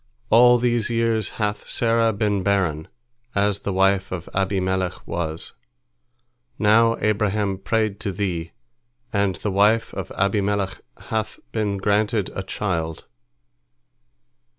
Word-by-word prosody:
All 120 +2 +7
these 120 -2 +1
years 115 -2 +1
hath 105 -1 -2
Sarah 115 -1 +2
been 105 -1 0
barren, 90 -6 0 0.5
as 100 0 +1
the 100 - -3
wife 95 0 +2
of 90 -2 -5
Abimelech 95 -1 -1
was. 80 -1 -4 1.0
Now 115 +2 +4
Abraham 105 -2 0
prayed 110 -1 0
to 100 - -2
Thee, 90 -4 -3 0.6
and 100 -2 +1
the 105 +4 -3
wife 105 +4 +3
of - - -5
Abimelech 100 -1 0 0.2
hath 110 -1 -3
been 105 -3 -1
granted 105 +1 +1
a - - -3
child. 85 -5 -3
100 Hz, 115 wpm, -23 LUFS, 95-110 Hz, 1.0 s, All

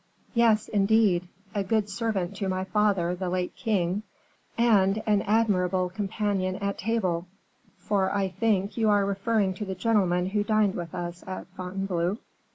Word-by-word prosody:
"Yes, 230 -3 +3
indeed; 200 -3 +3 0.3
a 200 - 0
good 215 +1 +1
servant 200 -3 -2
to 195 -1 -2
my 185 0 -1
father, 190 -3 +1
the 180 0 -3
late 180 0 -2
king, 195 -4 0 0.6
and 215 -3 +3
an 210 -2 +3
admirable 190 -4 +1
companion 195 -1 -1
at 200 +1 -3
table; 185 -6 -1 0.5
for, 195 -2 0
I 195 -1 0
think, 200 +1 0
you 220 -2 +3
are 205 -1 +4
referring 200 0 0
to 210 +3 -5
the 190 -1 -4
gentleman 185 -4 +1
who 205 0 +1
dined 215 -2 +2
with 170 -2 -6
us 175 0 -5
at 185 - -5
Fontainebleau?" 185 0 -2
195 Hz, 155 wpm, -27 LUFS, 185-215 Hz, 0.6 s, are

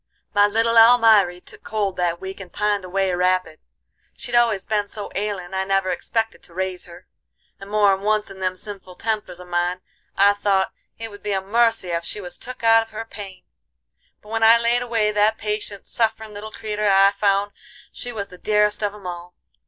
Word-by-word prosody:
My 205 0 +5
little 225 +2 +3
Almiry 225 -6 +6
took - - -14
cold 205 -3 -2
that 175 -1 0
week 190 +1 -7
and 190 -2 -10
pined 210 -2 0
away 190 0 -1
rapid. 180 -2 0 0.6
She'd 245 - -8
always 230 -5 +3
been 210 -2 0
so 205 0 -7
ailin' 195 -3 -4
I 190 0 0
never 195 -1 +1
expected 225 +5 -2
to 170 - -16
raise 185 -1 -3
her, 175 +1 -14 0.5
and 195 - -10
more 205 -1 +4
'n 190 - -3
once 210 0 0
in 190 - -11
them 185 -1 -1
sinful 195 -2 -9
tempers 210 -5 -3
of 180 - -11
mine 175 +1 -1 0.4
I'd 200 +1 +5
thought 195 -2 +1 0.3
it 225 -1 -6
would 205 0 -12
be 205 -1 -2
a 195 - +1
mercy 225 -1 +1
ef 170 0 -1
she 210 - -5
was 180 -3 -7
took 250 -1 -9
out 225 0 +6
of 225 - -8
her 225 +1 -6
pain. 200 -4 -10 0.8
But 210 - -15
when 225 0 -2
I 225 +1 +7
laid 235 +1 +2
away 225 -3 0
that 210 +1 +2
patient, 210 -1 -4
sufferin' 220 -1 -1
little 210 +1 -8
creeter 210 -1 -2
I 195 0 +6
found 200 0 +1 0.4
she 245 - -6
was 200 -4 -5
the 180 - -13
dearest 210 0 +1
of 205 -1 -1
'em 205 -3 -14
all. 175 0 -7
205 Hz, 200 wpm, -22 LUFS, 190-220 Hz, 0.8 s, I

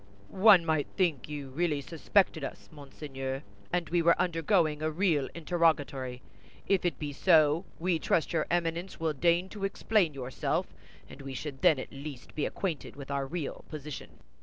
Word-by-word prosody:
"One 190 -3 +6
might 155 -3 +1
think 165 -8 +1
you 145 -2 -5
really 155 0 0
suspected 165 +2 +1
us, - - -7
monseigneur, 135 -2 -6 0.3
and 180 -1 0
we 175 0 +2
were 170 0 +4
undergoing 165 -2 +2
a 155 - +1
real 155 -4 +1
interrogatory. 150 -7 0 0.4
If 195 -2 +1
it 175 - 0
be 145 -2 -4
so, 160 +1 +4
we 170 -1 0
trust 160 +1 +1
your 160 -2 +1
Eminence 170 +1 -1
will 160 -1 0
deign 170 +5 +2
to 205 -1 -8
explain 195 -4 +1
yourself, 130 -1 -1 0.4
and 140 - -11
we 135 -1 -6
should 135 0 -6
then 155 - +5
at 130 - -6
least 140 -1 -8
be 150 - -1
acquainted 170 -7 -4
with 140 0 -8
our 140 -1 -1
real 160 -2 -4
position." 150 -2 -8
155 Hz, 165 wpm, -30 LUFS, 140-175 Hz, 0.4 s, One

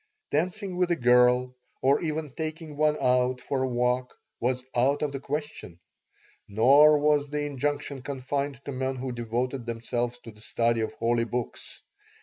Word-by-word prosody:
Dancing 185 +4 -1
with 180 -1 +2
a 175 - +3
girl, 125 0 +4 0.3
or 135 +2 +4
even 155 -2 -3
taking 155 +1 -5
one 150 0 +2
out 125 0 +2
for 135 +1 -2
a 130 - +1
walk, 125 0 -1 0.2
was 125 +1 -1
out 135 +5 +2
of 150 - -1
the 135 - -5
question. 145 - -5 0.7
Nor 140 +8 +6
was 145 -1 +2
the 150 0 -2
injunction 145 0 -3
confined 140 +1 -4
to - - -4
men 130 0 -2
who 130 0 -4
devoted 120 +2 -3
themselves 120 +1 -2
to 115 - -9
the 105 0 -18
study 115 +1 0
of 110 - -3
holy 115 -4 0
books. 120 +2 -6
130 Hz, 160 wpm, -27 LUFS, 125-145 Hz, 0.7 s, Nor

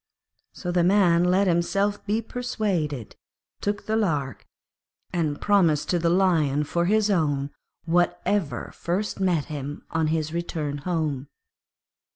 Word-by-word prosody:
So 180 - -5
the 175 -1 +2
Man 180 -2 +4
let 185 +3 +3
himself 195 +4 +1
be 220 +3 0
persuaded, 190 - -2 0.5
took 205 0 -2
the 220 - 0
lark, 150 - -1 0.7
and 155 -4 -1
promised 175 -8 +2
to 175 - +2
the 170 0 +2
Lion 165 -6 +2
for 170 +3 0
his 210 +2 +2
own 145 -6 0 0.3
whatever 175 +1 0
first 195 +5 -2
met 180 -6 +1
him 145 -2 -6
on 160 -1 +1
his 155 0 -1
return 155 -4 -3
home. 150 -4 -2
170 Hz, 130 wpm, -25 LUFS, 150-195 Hz, 0.7 s, Man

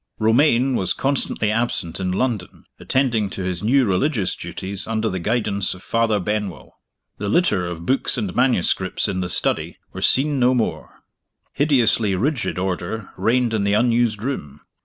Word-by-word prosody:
Romayne 125 +3 +3
was 95 -4 0
constantly 135 -5 0
absent 110 -7 -1
in 90 -1 -1
London, 105 -2 -2
attending 120 -6 0
to 95 - -5
his 90 -1 -3
new 130 +5 +3
religious 105 - 0
duties 100 +1 -6
under 110 -1 -1
the 95 - -3
guidance 100 -2 0
of 95 - -14
Father 115 -2 +1
Benwell. 100 -3 -4 0.4
The 100 - -2
litter 105 - +2
of 85 -1 -6
books 135 +6 0
and 210 -3 -3
manuscripts 105 -7 +1
in 95 - -2
the 90 -1 -2
study - - 0 0.2
was - - +2
seen 140 +1 +3
no 125 +1 +4
more. 115 - -3 0.5
Hideously 115 -8 +2
rigid 125 +4 -1
order 95 +3 -3
reigned 120 0 +1
in 105 -2 0
the 100 0 +1
unused 115 -1 +2
room. 75 - -5
110 Hz, 160 wpm, -21 LUFS, 95-125 Hz, 0.5 s, no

